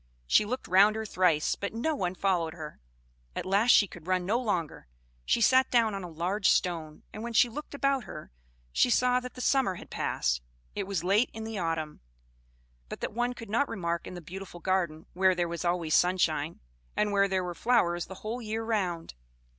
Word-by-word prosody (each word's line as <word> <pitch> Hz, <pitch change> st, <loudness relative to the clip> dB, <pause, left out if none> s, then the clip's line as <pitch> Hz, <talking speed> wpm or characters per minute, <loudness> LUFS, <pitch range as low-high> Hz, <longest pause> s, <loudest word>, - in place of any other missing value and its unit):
She 135 Hz, -, +4 dB
looked 255 Hz, +5 st, -4 dB
round 200 Hz, +4 st, +5 dB
her 220 Hz, 0 st, -3 dB
thrice, 180 Hz, -6 st, +2 dB
but 200 Hz, +2 st, -5 dB
no 280 Hz, +8 st, 0 dB
one 185 Hz, -10 st, -2 dB
followed 175 Hz, -4 st, 0 dB
her. 155 Hz, -3 st, -8 dB, 0.6 s
At -, -, -3 dB
last 200 Hz, +5 st, +2 dB
she 210 Hz, -, +7 dB
could 175 Hz, -3 st, -13 dB
run 185 Hz, -1 st, +1 dB
no 220 Hz, +6 st, +1 dB
longer; 180 Hz, -, -2 dB, 0.4 s
she -, -, +2 dB
sat 260 Hz, +3 st, +5 dB
down 230 Hz, -3 st, +3 dB
on 195 Hz, -1 st, -4 dB
a 180 Hz, -, -6 dB
large 180 Hz, +5 st, 0 dB
stone, 160 Hz, -4 st, 0 dB
and 215 Hz, -, -7 dB
when 235 Hz, +1 st, -5 dB
she 235 Hz, -, +5 dB
looked 295 Hz, +4 st, -7 dB
about 275 Hz, -3 st, +1 dB
her, 155 Hz, -, -9 dB, 0.4 s
she -, -, +3 dB
saw 250 Hz, +1 st, +3 dB
that 250 Hz, 0 st, -9 dB
the 250 Hz, -, -7 dB
summer 260 Hz, -8 st, +2 dB
had -, -, -12 dB
passed; -, -, -1 dB, 0.3 s
it 200 Hz, -2 st, -3 dB
was 195 Hz, -5 st, -2 dB
late 200 Hz, +7 st, +3 dB
in 220 Hz, -, -6 dB
the 220 Hz, -2 st, -4 dB
autumn, 165 Hz, -3 st, -2 dB, 0.9 s
but -, -, -6 dB
that -, -, -3 dB
one 240 Hz, +2 st, 0 dB
could 230 Hz, -4 st, -9 dB
not 275 Hz, +6 st, +1 dB
remark 170 Hz, -5 st, -3 dB
in -, -, -7 dB
the 175 Hz, -, -7 dB
beautiful 185 Hz, +1 st, -9 dB
garden, 170 Hz, -4 st, -1 dB
where 185 Hz, 0 st, +3 dB
there 175 Hz, -1 st, 0 dB
was 170 Hz, +1 st, -4 dB
always 175 Hz, -3 st, 0 dB
sunshine, 170 Hz, -4 st, +2 dB, 0.4 s
and 210 Hz, 0 st, +2 dB
where 200 Hz, 0 st, +3 dB
there 190 Hz, -1 st, 0 dB
were 175 Hz, -1 st, -4 dB
flowers 175 Hz, -4 st, +1 dB
the 190 Hz, -, -8 dB
whole 235 Hz, +3 st, -3 dB
year 220 Hz, 0 st, -3 dB
round. 185 Hz, -7 st, -2 dB
190 Hz, 205 wpm, -29 LUFS, 175-225 Hz, 0.9 s, she